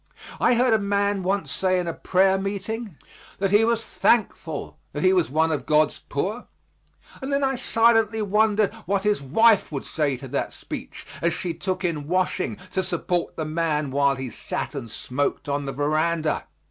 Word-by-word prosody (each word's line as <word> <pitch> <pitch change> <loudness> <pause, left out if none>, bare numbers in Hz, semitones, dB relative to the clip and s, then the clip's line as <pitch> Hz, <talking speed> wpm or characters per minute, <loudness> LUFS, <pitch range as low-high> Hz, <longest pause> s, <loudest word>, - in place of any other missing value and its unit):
I 250 - +4
heard 245 0 +3
a 220 - +4
man 200 0 0
once 185 -5 -1
say 185 +3 +1
in 180 - -2
a 165 - -1
prayer 190 +2 +2
meeting 200 -1 -4 0.4
that 195 -1 0
he 210 +2 +5
was 230 0 +1
thankful 180 -9 0
that 145 - -3
he 185 0 +5
was 180 -3 +2
one 160 +3 +2
of 155 - -2
God's 155 0 +3
poor, 200 +12 -2 0.7
and 265 +1 -4
then 280 0 +1
I 270 0 +2
silently 225 -3 +3
wondered 210 0 +2
what 195 0 +1
his 210 -6 +1
wife 210 - +4
would 140 -3 -4
say 145 -4 -1
to 135 - -9
that 140 - -2
speech, - - -8 0.2
as 170 0 +2
she 170 +1 -3
took 185 +1 -3
in 155 -4 -2
washing 185 +2 0
to 190 - 0
support 175 -1 -2
the 160 - -3
man 155 -2 -1
while 140 0 +3
he 130 -2 -5
sat - - -4
and 130 -6 -6
smoked 140 +7 -2
on 140 0 -2
the - - -2
veranda. 155 +3 0
185 Hz, 185 wpm, -24 LUFS, 150-205 Hz, 0.7 s, he